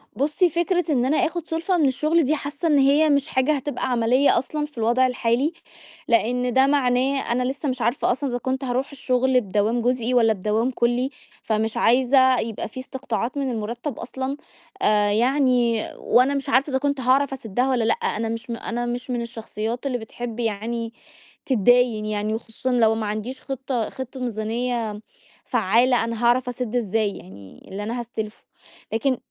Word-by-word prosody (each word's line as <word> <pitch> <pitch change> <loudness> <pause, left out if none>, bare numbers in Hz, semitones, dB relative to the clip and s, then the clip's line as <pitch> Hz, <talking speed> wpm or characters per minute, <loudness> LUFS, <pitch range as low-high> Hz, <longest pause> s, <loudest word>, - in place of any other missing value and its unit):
بُصي 300 - +2
فكرة 345 +1 0
إن 250 -4 +2
أنا 295 +4 +2
آخد 345 -2 -1
سُلفة 330 +3 0
من 315 - +3
الشغل 305 +5 +2
دي 295 +3 +2
حاسّة 290 +3 -4
إن 300 -3 +4
هي 285 +3 +4
مش 280 0 +2
حاجة 260 -1 +1
هتبقى 275 -1 -3
عَمَلية 245 +4 +3
أصلًا 295 +4 -2
في 295 -3 -16
الوضع 240 +3 +3
الحالي، 250 +5 0 0.5
لأن 245 +2 +1
ده 265 +2 +5
معناه 270 -1 +1
أنا 250 +1 +1
لسّه 275 +3 -2
مش 255 -1 -3
عارفة 240 +3 +1
أصلًا 270 +3 -2
إذا 245 - -1
كنت 260 +2 -3
هاروح 260 +2 -2
الشغل 260 -2 +1
بدوام 210 +3 0
جزئي 245 0 0
والّا 225 -3 +4
بدوام 215 +5 0
كُلّي، 245 +1 +1 0.3
فمش 220 0 -1
عايزة 260 +1 +4
يبقى 225 -2 -4
في 240 - -9
إستقطاعات 255 -1 -4
من 270 -2 -1
المُرتب 235 +4 -4
أصلًا 265 +3 -4 0.4
آآ 210 -1 +3
يعني 245 -1 +2
وأنا 255 +3 +3
مش 275 0 -3
عارفة 270 +2 +3
إذا 265 - +1
كنت 280 0 -1
هاعرف 270 +2 +2
أَسِدها 245 0 -1
والّا 250 -3 +1
لأ. 225 - +3
أنا 225 +1 -2
مش 230 +2 -5
أنا 235 +1 -3
مش 245 +1 -4
من 245 -1 -1
الشخصيّات 230 +1 -5
اللي 260 -3 0
بتحب 235 0 -7
يعني 230 +1 -2 0.5
تتداين 245 -2 +3
يعني 215 0 -1
وخصوصًا 225 +3 -4
لو 225 -3 +3
ما 220 -1 -2
عنديش 215 +5 -4
خطّة 265 -4 -3
خطّة 260 0 -7
ميزانيّة 230 -1 -2 0.4
فعالة 240 +2 +3
أنا 230 0 -4
هاعرف 250 +1 +3
أسِد 245 -1 -4
إزاي 220 -2 +1
يعني 95 +1 -14
اللي 200 +2 -5
أنا 235 +3 -3
هاستلفه، 220 -2 -6 0.5
لكن 255 +3 +1
245 Hz, 170 wpm, -23 LUFS, 225-270 Hz, 0.5 s, ده